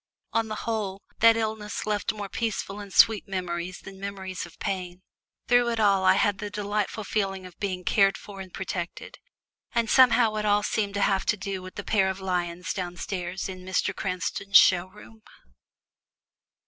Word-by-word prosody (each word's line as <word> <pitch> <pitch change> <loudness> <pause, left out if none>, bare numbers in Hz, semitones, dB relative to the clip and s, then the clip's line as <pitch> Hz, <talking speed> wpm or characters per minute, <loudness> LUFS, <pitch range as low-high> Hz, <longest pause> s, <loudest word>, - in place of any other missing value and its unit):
On 225 -1 +1
the 215 - -4
whole, 205 -4 -2 0.2
that 230 0 +6
illness 215 -2 -3
left 210 -2 0
more 210 -2 -6
peaceful 205 -1 -3
and 200 -1 -9
sweet 215 0 +5
memories 180 -1 -4
than 195 0 -11
memories 190 -2 -5
of 170 - -18
pain. 180 -1 -4 0.4
Through 245 0 +4
it 230 -1 -1
all 200 -3 +4
I 185 0 +6
had 200 0 +2
the 210 - -4
delightful 210 +1 -2
feeling 195 -2 -2
of 180 -2 -13
being 185 -3 -3
cared 195 +1 +3
for 195 -2 -10
and 190 -1 -9
protected, 175 -2 -5 0.6
and 230 -1 +1
somehow 235 -4 +5
it 210 - -1
all 205 0 +3
seemed 205 -1 -1
to 200 - 0
have 195 -1 +1
to 210 - +2
do 195 -1 -4
with 185 0 -10
the - - -5
pair 195 -3 +2
of 190 0 -4
lions 180 -1 -2
downstairs 180 0 -4
in 185 -1 -7
Mr. 185 +1 -1
Cranston's 195 +1 +2
show 180 0 +5
room! 210 +3 -16
195 Hz, 175 wpm, -26 LUFS, 185-210 Hz, 0.6 s, that